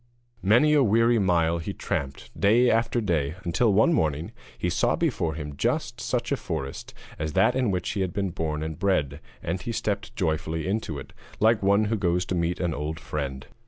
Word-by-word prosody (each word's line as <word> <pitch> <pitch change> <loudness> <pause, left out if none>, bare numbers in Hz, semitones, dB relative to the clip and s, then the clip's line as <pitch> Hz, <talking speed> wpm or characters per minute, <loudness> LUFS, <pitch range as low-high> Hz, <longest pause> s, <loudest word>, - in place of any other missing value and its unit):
Many 120 +10 +4
a 150 - +5
weary 115 0 +4
mile 85 -3 +2
he 80 - -4
tramped 70 0 -4
day 120 +5 +4
after 115 +1 +1
day, 80 -7 0
until, 110 +6 +2
one 110 - +4
morning, 80 - 0 0.3
he - - -2
saw - - +2
before 80 -1 -1
him 75 -2 -6
just - - -1
such - - -2
a - - +2
forest 70 0 -5 0.2
as 75 0 -3
that 95 +7 +3
in 130 -4 +1
which 90 -2 -1
he 100 - -2
had 95 -2 -1
been 100 0 -2
born 80 -3 -2
and 80 -1 -5
bred, 75 -8 0 0.2
and 95 - -2
he 120 - -4
stepped 105 +1 -3
joyfully 80 -3 -1
into 95 -6 -2
it, 65 - -9 0.3
like 110 0 +4
one 100 +2 +4
who 110 +1 0
goes 90 -2 +1
to - - -3
meet 85 0 0
an 85 -3 0
old 75 +2 -4
friend. 70 -5 -4
90 Hz, 195 wpm, -26 LUFS, 80-105 Hz, 0.3 s, a